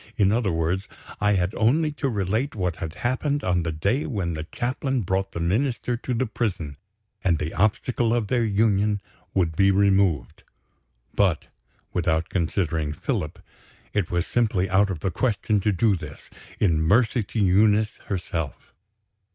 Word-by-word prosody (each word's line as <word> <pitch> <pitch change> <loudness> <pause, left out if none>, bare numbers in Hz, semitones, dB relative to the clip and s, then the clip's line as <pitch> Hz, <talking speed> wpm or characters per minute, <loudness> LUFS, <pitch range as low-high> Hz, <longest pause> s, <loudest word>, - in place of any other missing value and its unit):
In 100 -3 +4
other 110 -3 +1
words, 85 +5 -1 0.3
I 105 0 +3
had 90 +1 0
only 150 +8 +2
to 145 -1 -2
relate 110 +5 -1
what 90 -5 -1
had 80 0 -5
happened 140 +3 0
on 90 -1 +1
the 80 0 -2
day 100 - 0
when 95 -8 -2
the 80 0 -4
Chaplain 130 +1 -1
brought 95 0 -1
the - - -5
Minister 120 +8 0
to 125 +1 -3
the 130 - +1
prison, 95 - -3 0.5
and 85 -3 +3
the 75 +1 -3
obstacle 115 +4 +1
of 120 -2 +1
their 120 +2 +1
union 105 -1 +2 0.4
would 85 -4 +1
be 100 +3 +4
removed. 95 -7 +2 0.7
But, 95 -6 +1 0.4
without 80 -2 0
considering 80 -4 -1
Philip, 75 0 -3 0.6
it 100 -5 0
was 85 0 0
simply 105 -6 +1
out 100 +2 +4
of 85 -5 -4
the 95 - -1
question 105 0 0
to 105 +2 +1
do 100 +2 +2
this, 75 -5 -10 0.3
in 85 -6 +2
mercy 110 +8 +3
to 110 +2 -4
Eunice 105 +2 +3
herself. 85 -7 -4
100 Hz, 160 wpm, -24 LUFS, 85-115 Hz, 0.7 s, In